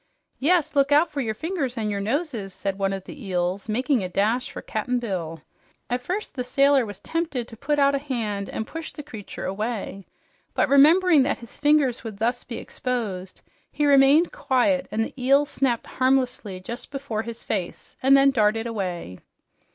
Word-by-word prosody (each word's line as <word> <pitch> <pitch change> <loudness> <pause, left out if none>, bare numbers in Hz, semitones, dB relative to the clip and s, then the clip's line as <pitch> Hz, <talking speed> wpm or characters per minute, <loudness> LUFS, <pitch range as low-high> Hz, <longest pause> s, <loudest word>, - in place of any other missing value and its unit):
"Yes, 310 +1 +2
look 280 0 +3
out 300 +4 +4
for 285 - -2
your 220 -3 -2
fingers 305 - -3
and 215 -2 -1
your 200 -1 -2
noses!" 230 - -2
said 195 0 -3
one 195 0 +1
of 195 -1 -4
the 285 +4 -10
eels, 185 +1 -2
making 250 +1 +1
a 185 - -3
dash 220 +7 0
for - - -7
Cap'n 245 +3 -2
Bill. 170 -9 -4 0.5
At 245 +1 0
first 370 +11 -4
the 255 -3 -3
sailor 275 0 +3
was 205 -2 -8
tempted 315 -8 -2
to 230 - -11
put 285 +6 -1
out 280 0 +4
a 280 - +1
hand 220 -8 -3
and 220 - -4
push 325 +5 -7
the 295 - -9
creature 220 -9 -8
away, 200 -1 -4 0.5
but - - +3
remembering 310 +3 +6
that 265 - +1
his 235 - -12
fingers 290 -4 +3
would 220 -4 -7
thus 240 +3 -1
be 230 - -6
exposed, 205 -8 -4 0.3
he 295 - 0
remained 285 +4 +5
quiet, 275 - +1
and 225 +1 0
the 260 - -10
eel 275 +3 +5
snapped 260 -4 0
harmlessly 255 -7 0
just 235 +7 -7
before 275 -6 -3
his 230 +1 -7
face 190 -5 -4
and 270 +1 +6
then 275 0 +5
darted 225 -2 +2
away. 180 - -4
245 Hz, 185 wpm, -24 LUFS, 210-280 Hz, 0.5 s, remembering